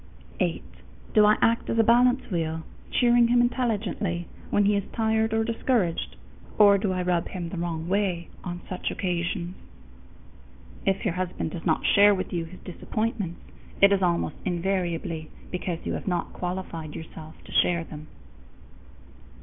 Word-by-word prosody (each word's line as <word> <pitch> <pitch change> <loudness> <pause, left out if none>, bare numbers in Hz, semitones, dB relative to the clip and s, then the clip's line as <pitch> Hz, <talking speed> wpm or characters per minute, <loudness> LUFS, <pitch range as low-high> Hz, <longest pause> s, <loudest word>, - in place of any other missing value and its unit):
_8. - - 0 0.5
Do 210 -1 +6
I 210 - +5
act 230 0 +2
as 230 - 0
a 225 - +6
balance 245 +2 +4
wheel, 160 -2 -1 0.3
cheering 240 -1 +4
him 240 +1 +4
intelligently 210 -8 0 0.2
when 205 - +3
he 205 +1 +3
is 200 - 0
tired 220 -1 +1
or 225 0 +2
discouraged, 225 -6 0 0.4
or 200 -2 +7
do 195 -1 0
I 185 -1 -1
rub 175 -1 +1
him 175 -3 -5
the 180 - -6
wrong 170 -1 -3
way 185 -3 0 0.2
on 175 -1 -5
such 185 - -3
occasions?_ 175 -1 -2 1.3
If 195 +2 +1
your 195 - +1
husband 180 -3 -3
does 170 +1 -5
not 160 - +1
share 205 0 +6
with 185 - -4
you 170 -2 -1
his 185 +3 -12
disappointments, 205 -1 -3 0.4
it 200 0 +7
is 195 - +2
almost 175 -2 0
invariably 175 -3 -2 0.2
because 180 -2 -4
you - - -1
have - - -5
not 175 -2 -1
qualified 175 -4 -5
yourself 160 0 -9
to - - -13
share 170 -1 +3
them. 155 -1 -10
185 Hz, 160 wpm, -26 LUFS, 170-215 Hz, 1.3 s, or